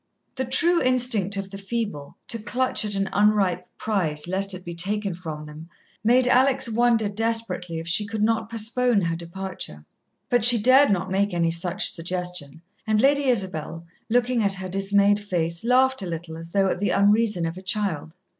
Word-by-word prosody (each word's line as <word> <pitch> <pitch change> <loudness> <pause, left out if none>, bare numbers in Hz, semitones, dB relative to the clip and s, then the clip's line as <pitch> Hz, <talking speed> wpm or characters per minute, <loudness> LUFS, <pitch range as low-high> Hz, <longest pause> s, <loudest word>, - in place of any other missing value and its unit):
The 260 0 -3
true 335 +7 +2
instinct 245 -6 0
of 195 -1 -5
the 195 - -8
feeble, 200 -8 -5
to 230 - -1
clutch 250 +5 -1
at 205 -1 -4
an 195 0 -1
unripe 195 -4 +1
prize 170 -8 -1
lest 190 +1 -1
it 185 - -11
be 170 - -6
taken 200 +3 -1
from 160 -3 -7
them, 155 +2 -11 0.3
made 245 +3 +3
Alex 260 +1 +3
wonder 230 -1 +2
desperately 205 -5 +2
if 165 +1 -6
she 205 +5 +2
could 220 0 -3
not 225 0 0
postpone 230 0 +1
her 165 -2 -1
departure. 170 - -7 0.4
But 245 -2 +1
she 240 +1 +8
dared 260 +6 +5
not 185 -2 -1
make 195 -1 0
any 165 -1 +1
such 175 +4 0
suggestion, 175 -3 -5 0.2
and 215 -1 +2
Lady 280 +3 +3
Isabel, 185 - -2 0.2
looking 245 +1 +1
at 200 -2 +1
her 190 -1 -6
dismayed 200 +2 +2
face, 170 -4 -3
laughed 260 +1 +2
a 190 - -5
little 165 -1 -6
as 165 +1 -10
though 195 +2 +1
at 185 - -2
the 205 - 0
unreason 205 -3 +2
of 165 +1 -4
a 185 - -9
child. 185 -5 -2
200 Hz, 185 wpm, -23 LUFS, 175-230 Hz, 0.4 s, she